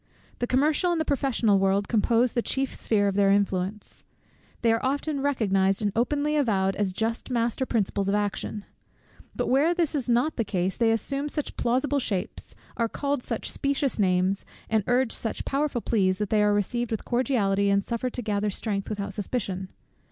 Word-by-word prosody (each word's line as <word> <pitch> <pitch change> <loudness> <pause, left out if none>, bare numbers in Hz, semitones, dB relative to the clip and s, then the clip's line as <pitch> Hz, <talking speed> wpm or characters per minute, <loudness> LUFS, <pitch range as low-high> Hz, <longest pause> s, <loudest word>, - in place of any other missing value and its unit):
The 245 - -1
commercial 300 +8 +2
and 340 - 0
the 315 - 0
professional 250 -8 +2
world 195 +1 +2
compose 235 +2 +2
the 240 - +1
chief 270 +2 -1
sphere 205 -2 +1
of 200 - 0
their 200 0 +3
influence. 195 0 0 0.6
They 230 -1 +4
are 225 - -1
often 280 +2 -1
recognized 195 -8 +2
and 205 -2 0
openly 290 +6 +1
avowed 195 -9 +1
as 205 -2 0
just 225 +6 -2
master 240 +1 0
principles 200 -3 0
of 200 - +2
action. 205 0 -2 0.7
But - - -1
where 295 +7 +3
this 335 -4 +1
is 270 -5 -2
not 245 +7 +2
the 230 - +2
case, 185 -2 -1
they 230 -1 +2
assume 275 +6 -1
such 300 -1 -4
plausible 260 +4 +1
shapes, 200 -8 -4 0.2
are 230 -1 +1
called 285 +2 -1
by - - -15
such - - -2
specious 275 -3 0
names, 185 0 +2 0.3
and 220 -2 +2
urge 245 -1 +2
such 225 - -4
powerful 275 -3 -1
pleas, 190 -5 +1
that 210 -1 -3
they 215 -1 +4
are 210 0 +4
received 225 +4 0
with 220 - -3
cordiality, 210 -6 +1
and 200 0 +2
suffered 235 +3 -3
to 245 - -3
gather 210 -1 0
strength 200 0 -3
without 200 -1 -4
suspicion. 190 -3 -3
225 Hz, 185 wpm, -26 LUFS, 200-265 Hz, 0.7 s, They